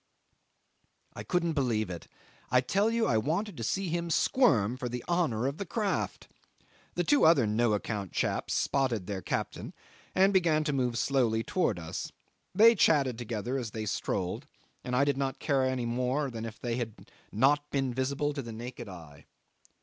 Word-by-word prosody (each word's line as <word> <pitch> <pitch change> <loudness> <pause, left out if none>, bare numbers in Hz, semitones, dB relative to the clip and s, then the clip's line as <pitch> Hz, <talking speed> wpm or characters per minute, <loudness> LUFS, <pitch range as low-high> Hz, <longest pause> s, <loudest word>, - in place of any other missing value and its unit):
'I - - -6
couldn't 170 -3 0
believe 115 -9 0
it. 85 - -8 0.4
I 125 - +5
tell 195 - +1
you 230 0 +1
I 110 - +2
wanted 170 - -1
to 115 - -6
see 190 - -1
him 170 +1 -2
squirm 125 - +3
for 130 -1 -4
the 125 0 -5
honour 160 -10 +1
of 140 +3 -2
the - - -1
craft. 210 +1 -2 0.7
The - - +1 0.2
other 160 -5 +6
two 105 - -1
no 115 0 +2
account 100 -2 -3
chaps - - -1
spotted 125 -8 0
their 100 -1 -4
captain, - - -4 0.4
and 195 +2 +4
began 165 -5 +3
to 150 -1 -1
move 125 -3 0
slowly 120 -5 +1
towards 115 - 0
us. 80 -1 -5 0.4
They 230 +2 +8
chatted 140 - +3
together 120 +2 -3
as 120 -3 -4
they 110 0 -5
strolled, 95 -3 -2 0.4
and 125 - -2
I 140 +3 +4
did 140 -2 +1
not 135 -1 -1
care 140 -3 +1
any 130 -2 -1
more 125 +4 -1
than 115 -1 -5
if 115 -1 -8
they 120 -1 -2
had 115 -4 -6 0.2
not 145 +6 +2
been 135 -3 -1
visible 140 +3 -1
to 140 - -3
the 115 -3 -8
naked 120 0 -7
eye. 80 -6 -12
130 Hz, 180 wpm, -30 LUFS, 115-155 Hz, 0.7 s, They